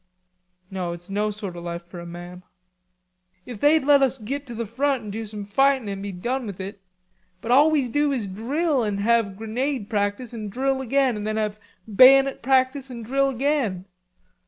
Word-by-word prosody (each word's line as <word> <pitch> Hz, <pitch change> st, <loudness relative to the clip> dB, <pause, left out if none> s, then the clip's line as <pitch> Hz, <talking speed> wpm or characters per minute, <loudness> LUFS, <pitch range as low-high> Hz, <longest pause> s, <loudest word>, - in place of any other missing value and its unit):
"No, 180 Hz, -3 st, -3 dB
it's 175 Hz, +2 st, -11 dB
no 210 Hz, +2 st, 0 dB
sort 205 Hz, -3 st, -6 dB
of 170 Hz, -, -8 dB
life 170 Hz, 0 st, -5 dB
for 175 Hz, 0 st, -10 dB
a 170 Hz, -, -8 dB
man." 175 Hz, +1 st, -9 dB, 1.0 s
"If 240 Hz, -4 st, -8 dB
they'd 300 Hz, +2 st, +4 dB
let 285 Hz, -1 st, +6 dB
us 265 Hz, -1 st, +2 dB
git 270 Hz, +5 st, -5 dB
to 240 Hz, -, -7 dB
the 230 Hz, +1 st, -3 dB
front 260 Hz, +3 st, -1 dB
an' 210 Hz, -, -6 dB
do 220 Hz, +1 st, -5 dB
some 210 Hz, -1 st, -6 dB
fightin' 270 Hz, +3 st, +2 dB
an' 195 Hz, -1 st, -4 dB
be 200 Hz, 0 st, -5 dB
done 240 Hz, +7 st, -3 dB
with 195 Hz, -2 st, -7 dB
it.... 195 Hz, +1 st, -7 dB, 0.6 s
But 230 Hz, -, -4 dB
all 285 Hz, +5 st, +6 dB
we 290 Hz, -5 st, +1 dB
do 290 Hz, +4 st, +1 dB
is 250 Hz, -6 st, -1 dB
drill 265 Hz, -, -1 dB
and 205 Hz, -2 st, -2 dB
have 220 Hz, -3 st, +1 dB
grenade 230 Hz, +1 st, -3 dB
practice 205 Hz, +3 st, -1 dB
an' 215 Hz, -3 st, -5 dB
drill 265 Hz, +4 st, -1 dB
again 265 Hz, -1 st, +1 dB
and 210 Hz, 0 st, -4 dB
then 215 Hz, 0 st, -1 dB
have 215 Hz, -1 st, -2 dB, 0.3 s
bayonet 265 Hz, +5 st, +6 dB
practice 265 Hz, +1 st, +1 dB
an' 235 Hz, -2 st, -7 dB
drill 275 Hz, +4 st, +1 dB
again. 260 Hz, -8 st, -1 dB
230 Hz, 195 wpm, -24 LUFS, 200-270 Hz, 1.0 s, let